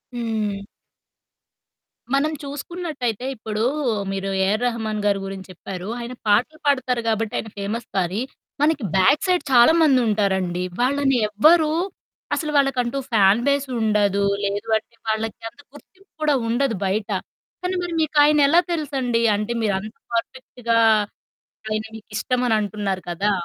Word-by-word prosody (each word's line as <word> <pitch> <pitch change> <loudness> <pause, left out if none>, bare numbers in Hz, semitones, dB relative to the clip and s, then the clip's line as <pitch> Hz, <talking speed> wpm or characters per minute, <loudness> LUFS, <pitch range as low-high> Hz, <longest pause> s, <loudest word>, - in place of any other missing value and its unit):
హ్మ్. 220 -4 -2 1.5
మనం 295 +3 +2
చూసుకున్నట్టయితే 280 - -4
ఇప్పుడు 215 -1 -3 0.5
మీరు 195 0 -3 0.2
ఏఆర్ 210 +4 +1
రెహమాన్ 220 -3 -2
గారి 200 -1 +2
గురించి 195 -1 -7
చెప్పారు. 185 +1 -7
ఆయన 240 +1 -6
పాటలు 245 +10 +2
పాడుతారు 255 -4 +1
గాబట్టి 220 -1 0
ఆయన 220 - -4
ఫేమస్ 215 +4 -4
కానీ 185 +3 0 0.4
మనకి 300 -4 +2
బ్యాక్ 190 - +4
సైడ్ 360 -1 +2
చాలామందుంటారండి. 220 - +3 0.2
వాళ్ళని 270 0 +2
ఎవ్వరు 305 +9 +4 0.6
అసలు 305 -3 -2
వాళ్ళకంటూ 270 -2 +1
ఫ్యాన్ 205 -1 +5
బేసుండదు. 220 -8 +1 0.2
లేదు 205 +3 -3
అంటే 220 +2 -12
వాళ్ళకి 220 0 -2
అంత 225 - -30
గుర్తింపు 385 +6 -18
కూడా 300 -2 +3
ఉండదు 240 +1 +1
బయట. 200 +2 -1 0.5
కానీ 365 0 -2
మరి 350 -1 -4
మీకాయన 300 -1 +4
ఎలా 330 +5 +5
తెలుసండి 265 -7 -1
అంటే 210 +3 -2
మీరు 210 -3 +1
అంత 215 +3 -9 0.2
పర్ఫెక్ట్‌గా 235 -1 -2 0.9
ఆయన 215 0 -2
మీకిష్టమని 225 +2 -1
అంటున్నారు 205 -2 -2
కదా! 195 +5 0
230 Hz, 125 wpm, -22 LUFS, 205-280 Hz, 1.5 s, ఫ్యాన్